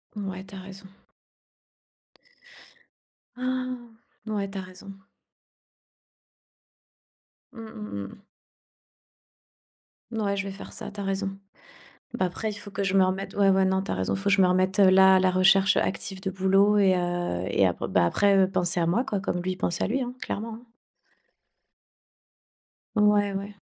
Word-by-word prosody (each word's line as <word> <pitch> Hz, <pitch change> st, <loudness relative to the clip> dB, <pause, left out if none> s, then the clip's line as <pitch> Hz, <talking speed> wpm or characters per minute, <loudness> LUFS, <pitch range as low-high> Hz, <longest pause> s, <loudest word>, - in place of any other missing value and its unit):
Ouais, 190 Hz, -3 st, -5 dB
tu 195 Hz, -, -12 dB
as -, -, -7 dB
raison. 190 Hz, +1 st, -11 dB, 2.5 s
Ah. 255 Hz, 0 st, -2 dB, 0.5 s
Ouais, 205 Hz, -2 st, -2 dB
tu 195 Hz, -, -8 dB
as -, -, -3 dB
raison. 185 Hz, +1 st, -11 dB, 2.6 s
Mmh, 225 Hz, -, -10 dB
mmh, 100 Hz, -1 st, -6 dB
mmh. 100 Hz, -, -11 dB, 1.9 s
Ouais 205 Hz, -3 st, -1 dB
je 195 Hz, -, -2 dB
vais 195 Hz, -, -6 dB
faire 195 Hz, -, -10 dB
ça -, -, -8 dB
tu 205 Hz, 0 st, -7 dB
as -, -, -4 dB
raison. 195 Hz, 0 st, -3 dB, 0.8 s
Bah 185 Hz, -, 0 dB
après 215 Hz, +5 st, -4 dB
il -, -, -6 dB
faut 205 Hz, -, -10 dB
que 200 Hz, 0 st, -3 dB
je 195 Hz, -1 st, -1 dB
me 190 Hz, -, +6 dB
remette 190 Hz, +1 st, -3 dB
ouais, 200 Hz, -1 st, +4 dB
ouais, 190 Hz, 0 st, +3 dB
non 190 Hz, 0 st, +1 dB
tu -, -, -6 dB
as -, -, 0 dB
raison, 95 Hz, 0 st, -1 dB
faut 195 Hz, -, -7 dB
que 200 Hz, -, +2 dB
je 195 Hz, -, +4 dB
me -, -, +5 dB
remette 185 Hz, +1 st, +1 dB
là 190 Hz, 0 st, +7 dB
à -, -, +4 dB
la 185 Hz, 0 st, +3 dB
recherche 190 Hz, +2 st, +4 dB
active 190 Hz, 0 st, -2 dB
de 190 Hz, 0 st, -3 dB
boulot 195 Hz, +2 st, +3 dB
et 195 Hz, -2 st, +4 dB
heu, 175 Hz, -, -2 dB
et -, -, +2 dB
après 90 Hz, -, -2 dB
ben -, -, +3 dB
après, 200 Hz, -, +3 dB
heu, 190 Hz, -1 st, +3 dB
penser 180 Hz, -1 st, +1 dB
à 165 Hz, -, +1 dB
moi 200 Hz, +10 st, +1 dB
quoi 210 Hz, -7 st, -2 dB
comme 180 Hz, -2 st, -2 dB
lui, 185 Hz, +1 st, -2 dB
il -, -, -7 dB
pense 170 Hz, -2 st, -2 dB
à -, -, +1 dB
lui, 260 Hz, +6 st, -1 dB
hein, 245 Hz, 0 st, -4 dB
clairement, 225 Hz, +2 st, -5 dB
hein. 225 Hz, -, -12 dB, 2.3 s
Ouais, 210 Hz, -1 st, +3 dB
ouais. 200 Hz, +1 st, -6 dB
195 Hz, 170 wpm, -26 LUFS, 185-205 Hz, 2.6 s, là